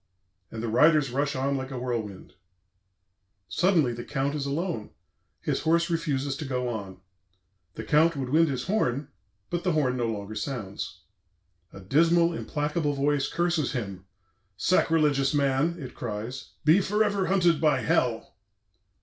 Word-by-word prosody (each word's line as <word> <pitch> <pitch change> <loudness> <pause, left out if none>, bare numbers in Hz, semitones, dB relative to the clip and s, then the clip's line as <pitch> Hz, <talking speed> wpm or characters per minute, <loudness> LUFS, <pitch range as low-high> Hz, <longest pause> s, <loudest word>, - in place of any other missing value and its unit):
and 110 0 -6
the - - -1
riders 150 +4 +4
rush 140 +2 -1
on 135 +2 0
like 130 -1 -4
a 135 - -6
whirlwind. 115 -6 -4 1.1
"Suddenly 165 -10 +2
the 120 0 -6
Count 135 +3 -2
is 145 -2 -3
alone; 150 - -3 0.5
his - - -1
horse 170 +2 +2
refuses 145 -5 -1
to 160 - -5
go 125 -3 -2
on; 100 -5 -5 0.8
the 110 - -5
Count 155 +7 +3
would 135 -3 -3
wind 160 +4 +4
his 130 -2 -2
horn, 145 - -1 0.4
but 175 0 -2
the 180 -2 +1
horn 130 -5 +1
no 120 -2 0
longer 105 -1 -4
sounds.... 105 -5 -5 0.7
A - - -11
dismal, 170 - +3
implacable 150 -1 -1
voice 140 0 +1
curses 170 -5 0
him: 100 -7 -5 0.5
'Sacrilegious 150 - +2
man,' 140 +4 +1
it 135 -6 -8
cries, 115 +3 -6
'be 160 +6 +6
forever 205 -1 +1
hunted 175 -4 +3
by 150 -5 +3
Hell!' 115 -3 0
140 Hz, 145 wpm, -27 LUFS, 125-165 Hz, 1.1 s, be